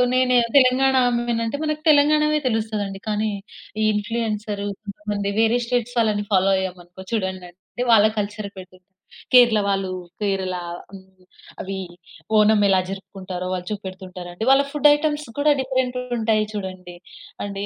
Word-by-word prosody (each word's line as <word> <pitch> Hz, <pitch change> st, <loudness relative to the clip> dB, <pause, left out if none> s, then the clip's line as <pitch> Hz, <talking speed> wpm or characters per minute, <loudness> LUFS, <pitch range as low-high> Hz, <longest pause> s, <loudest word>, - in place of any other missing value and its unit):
నేను 255 Hz, -1 st, +3 dB, 0.2 s
తెలంగాణ 265 Hz, +1 st, +3 dB
ఆమెని 235 Hz, -1 st, -1 dB
అంటే 285 Hz, +6 st, -4 dB
మన 305 Hz, -, 0 dB, 0.2 s
తెలంగాణవే 300 Hz, +1 st, +3 dB
తెలుస్తది 220 Hz, -2 st, -1 dB
అండి. 195 Hz, 0 st, -8 dB
కానీ 210 Hz, 0 st, 0 dB, 0.5 s
ఈ -, -, +3 dB
ఇన్ఫ్లుయెన్సర్ 210 Hz, -1 st, -3 dB, 0.2 s
కొంతమంది 205 Hz, 0 st, -4 dB
వేరే 225 Hz, +2 st, +3 dB
స్టేట్స్ 245 Hz, 0 st, -1 dB
వాళ్ళని 210 Hz, -2 st, +1 dB
ఫాలో 190 Hz, +1 st, +4 dB
అయ్యామనుకో 180 Hz, 0 st, -7 dB
చూడండి 190 Hz, -4 st, -2 dB
అండి. 185 Hz, +2 st, -42 dB, 0.3 s
వాళ్ళ 215 Hz, -1 st, +6 dB, 0.2 s
కల్చర్ 205 Hz, 0 st, -5 dB
పెడుతుంటారు. 185 Hz, 0 st, -13 dB, 0.5 s
కేరళ 240 Hz, -4 st, +7 dB
వాళ్ళు 195 Hz, -1 st, 0 dB, 0.3 s
కేరళ 190 Hz, -2 st, -1 dB, 0.4 s
హ్మ్. 190 Hz, -1 st, -15 dB, 0.4 s
అవి 195 Hz, +1 st, -5 dB, 0.6 s
ఓనం 210 Hz, 0 st, +5 dB
ఎలా 190 Hz, -1 st, +4 dB
జరుపుకుంటారో, 190 Hz, -2 st, -6 dB
వాళ్ళు 180 Hz, -1 st, -5 dB
చూపెడుతుంటారండి. 185 Hz, -1 st, -7 dB
వాళ్ళ 270 Hz, +1 st, +6 dB
ఫుడ్ 295 Hz, 0 st, +4 dB
ఐటెమ్స్ 295 Hz, 0 st, -1 dB
కూడా 295 Hz, +1 st, +4 dB
డిఫరెంట్‌గా 255 Hz, -1 st, -1 dB
ఉంటాయి 220 Hz, -1 st, +2 dB
చూడండి 185 Hz, -3 st, -7 dB, 0.5 s
అండి. 200 Hz, 0 st, -4 dB
210 Hz, 135 wpm, -22 LUFS, 190-245 Hz, 0.6 s, కేరళ